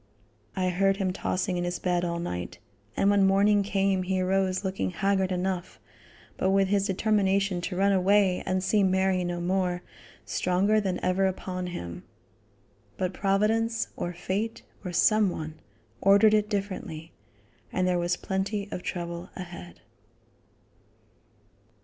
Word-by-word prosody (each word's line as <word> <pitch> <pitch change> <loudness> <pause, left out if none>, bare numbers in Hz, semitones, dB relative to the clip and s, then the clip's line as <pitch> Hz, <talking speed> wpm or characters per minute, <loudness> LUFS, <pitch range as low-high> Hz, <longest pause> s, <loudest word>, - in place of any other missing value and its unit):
I 185 -1 +1
heard 195 +2 +2
him 190 -2 -1
tossing 185 -1 -1
in 175 - -1
his 175 0 -2
bed 180 -1 0
all 170 -1 -1
night, 90 - -4 0.4
and 200 - +4
when 200 -1 +4
morning 200 +2 +4
came 195 -1 +1
he 185 +1 -1
arose 190 +1 +1
looking 190 - -1
haggard 190 - 0
enough, 185 0 -3 0.6
but 190 - +1
with 195 0 +3
his 200 0 +2
determination 195 -2 +1
to 180 - -4
run 200 +2 +3
away 195 0 +3
and 185 0 0
see 210 +2 +2
Mary 190 -1 +2
no 175 0 -3
more, 180 0 -1 0.4
stronger 195 +4 +1
than 190 -3 -2
ever 190 +1 +2
upon 185 -1 -4
him. 85 - -6 1.0
But 185 0 -1
providence, 220 +4 +1
or 175 - -3
fate, 190 +6 -3 0.2
or 180 - -4
some 210 +3 +4
one, 155 -2 -6 0.4
ordered 200 +2 +6
it 210 -1 +2
differently, 185 -6 -4 0.6
and 185 0 0
there 180 -1 +2
was 175 +1 0
plenty 200 +1 -2
of - - -4
trouble 170 0 -5
ahead. 175 -1 -9
190 Hz, 145 wpm, -27 LUFS, 180-200 Hz, 1.0 s, ordered